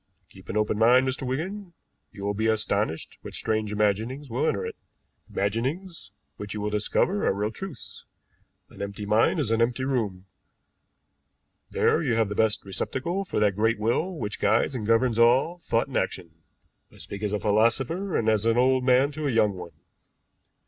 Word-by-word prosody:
Keep - - -16
an 105 - -2
open 105 0 0
mind, 125 +3 +5
Mr. 130 0 -2
Wigan; 175 +8 -4 0.4
you 100 - -10
will 100 0 0
be 110 +2 0
astonished 105 -5 -1
what - - -9
strange 110 -1 -1
imaginings 110 +6 -1
will 120 - 0
enter - - -1
it - - -6 0.5
imaginings 130 - -3 0.3
which 105 0 -6
you - - -3
will 105 0 -2
discover 110 - +1
are - - +3
real 105 +2 -1
truths. 190 - -9 0.7
An - - -11
empty 100 +1 -5
mind 110 - +3
in 120 -7 0
an 115 - +1
empty 120 +2 +1
room, 105 -9 -2 1.4
there - - +2
you 130 -7 0
have 110 -3 +1
the - - -2
best 110 -1 +1
receptacle 170 - -3
for 185 - -2
that 105 -2 +3
great 110 +2 +2
will 120 - -1
which 105 -7 -4
guides 110 +6 +2
and 110 -5 -4
governs 115 0 +2
all 130 +9 +4
thought 115 -8 0
and 135 - -3
action. 85 -3 -2 0.6
I - - -18
speak 100 - -7
as 105 -2 -1
a 105 - 0
philosopher, 120 - +1
and 110 - -1
as 110 0 +2
an 115 +1 +3
old 130 +1 +3
man 130 +3 +4
to 150 0 -3
a - - +1
young 105 -3 +3
one. 85 -3 -10
115 Hz, 185 wpm, -26 LUFS, 105-130 Hz, 1.4 s, mind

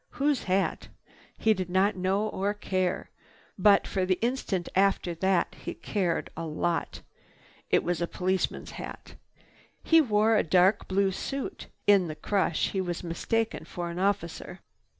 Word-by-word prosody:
Whose 285 -2 0
hat? 190 +1 0 0.5
He 220 - +3
did 185 -3 -4
not 190 +3 +2
know 190 +3 0
or 205 0 -1
care. 185 -3 -2 0.4
But 200 +1 +5
for 190 - -1
the 185 0 +1
instant 230 -7 -1
after 190 -2 +2
that 185 +1 +1
he - - -5
cared 180 -5 -2
a 165 - -5
lot. 165 0 -2 0.7
It - - +3
was 175 -1 -1
a 170 - 0
policeman's 185 +1 -1
hat. - - -9 0.7
He 325 0 +6
wore 220 -3 +3
a - - +3
dark 185 +4 +3
blue 195 0 +2
suit. 275 - -5 0.2
In 200 -3 +5
the 155 - -5
crush 190 -2 0
he 190 - -1
was 175 -1 -4
mistaken 220 +5 -1
for 170 +1 -5
an 170 - -5
officer. 185 -4 -2
190 Hz, 150 wpm, -28 LUFS, 175-205 Hz, 0.7 s, He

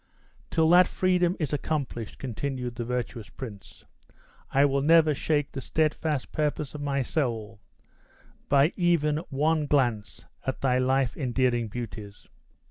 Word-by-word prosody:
"Till 160 -1 +2
that 180 0 +7
freedom 180 -1 +1
is 150 -3 -2
accomplished," 140 -7 -3
continued 130 -1 -4
the 120 - -4
virtuous 120 -2 -4
prince, 110 -7 -10 0.6
"I 140 +1 +4
will 140 -1 +1
never 160 +1 +5
shake 145 0 0
the 135 - -5
steadfast 155 -1 -1
purpose 150 -1 -2
of 150 - -6
my 140 -2 0
soul 115 -7 -2 0.9
by 140 +3 +4
even 160 -4 +2
once 150 +2 +1
glance 120 -7 0 0.2
at 130 - -3
thy 130 -2 +2
life 130 0 +1
endearing 125 -3 0
beauties. 105 -2 -8
135 Hz, 130 wpm, -27 LUFS, 120-155 Hz, 0.9 s, that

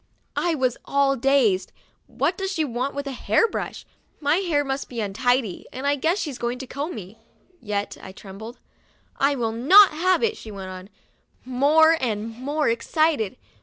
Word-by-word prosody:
I 345 -2 +1
was 255 -4 0
all 275 -1 +2
dazed. 240 -8 +2 0.4
"What 360 - -1
does 385 +1 -3
she 320 -5 0
want 255 +2 -3
with 285 0 -3
a 275 - -4
hair 270 - +2
brush. - - -5 0.3
My 295 +2 +2
hair 330 -7 0
must 270 0 -3
be 240 - -6
untidy, 220 +1 0
and 260 +2 -6
I 285 0 +3
guess 320 +7 0
she's 295 -10 -4
going 240 +1 -2
to 265 - -7
comb 285 +6 -5
me." 210 +1 -10 0.4
Yet 205 -2 -3
I 190 - -9
trembled. 205 +5 -10 0.6
"I 280 +1 +2
will 230 -4 -1
not 360 - +7
have 360 +4 +1
it," 450 -1 +1
she 220 - -10
went 195 -2 -7
on, 185 +1 -9 0.6
more 300 +6 +4
and 220 -3 -1
more 290 +5 -1
excited. 235 - +1
270 Hz, 175 wpm, -24 LUFS, 225-310 Hz, 0.6 s, not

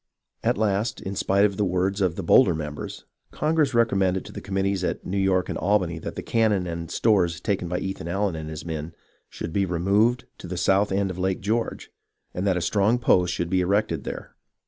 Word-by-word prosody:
At - - +1
last, 105 +2 0
in 95 +1 -5
spite 100 +2 +3
of 100 -2 -1
the 105 - +1
words 95 +2 0
of 90 -3 +1
the 95 - -4
bolder 90 0 +5
members, 75 -1 -6 0.2
Congress 150 -4 +1
recommended 95 -5 +2
to - - -9
the - - -7
committees 95 -1 -1
at - - -2
New 100 +2 -1
York 95 -2 +2
and - - -3
Albany 90 -5 +1
that - - -6
the - - -5
cannon 110 -5 +1
and 85 -1 -5
stores 90 -7 +2
taken 95 -1 -1
by 90 +1 -2
Ethan 95 -3 -4
Allen 95 0 -1
and 80 -1 -6
his 80 +1 -7
men 80 0 -5 0.3
should 80 - -6
be 100 - +2
removed 100 +7 +2
to - - -8
the 90 0 -5
south 95 +3 +2
end 95 0 0
of 90 - -7
Lake 95 0 -1
George, 110 +4 -2 0.4
and 95 +3 -2
that 95 -2 +2
a - - -1
strong 105 +6 +2
post 90 -7 +3
should 85 0 -3
be 95 -1 +3
erected 90 -5 0
there. - - -7
95 Hz, 215 wpm, -25 LUFS, 90-100 Hz, 0.4 s, bolder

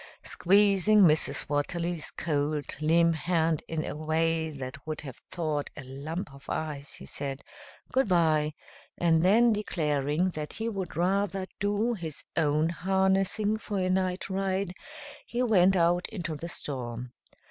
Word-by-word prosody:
Squeezing 200 +2 +4
Mrs. 155 -4 +3
Watterly's 165 +3 -1
cold, 150 -1 -2
limp 165 +2 +4
hand 160 -1 +1
in 160 -1 -2
a - - -4
way 160 +1 0
that 135 -2 -7
would 155 -1 -3
have 135 -5 -9
thawed 155 -4 -2
a 140 - -6
lump 140 +5 -6
of 140 - -14
ice, 150 -2 -3
he - - -9
said 140 -1 -5 0.5
"goodby;" 165 - +2 0.4
and 165 -2 +3
then 225 +6 +5
declaring 155 -4 0
that 150 -2 -5
he 225 +1 -3
would 195 -7 -4
rather 190 +1 +1
do 205 +4 +1
his 165 -8 -5
own 155 0 +2
harnessing 190 +4 +1
for 205 -2 -4
a 185 -1 +1
night 185 -1 0
ride, 190 -1 -1 0.5
he 245 +1 -1
went 195 -5 +4
out 175 0 +2
into 175 -7 -4
the 165 +4 -6
storm. 125 -5 -5
170 Hz, 140 wpm, -28 LUFS, 150-190 Hz, 0.5 s, then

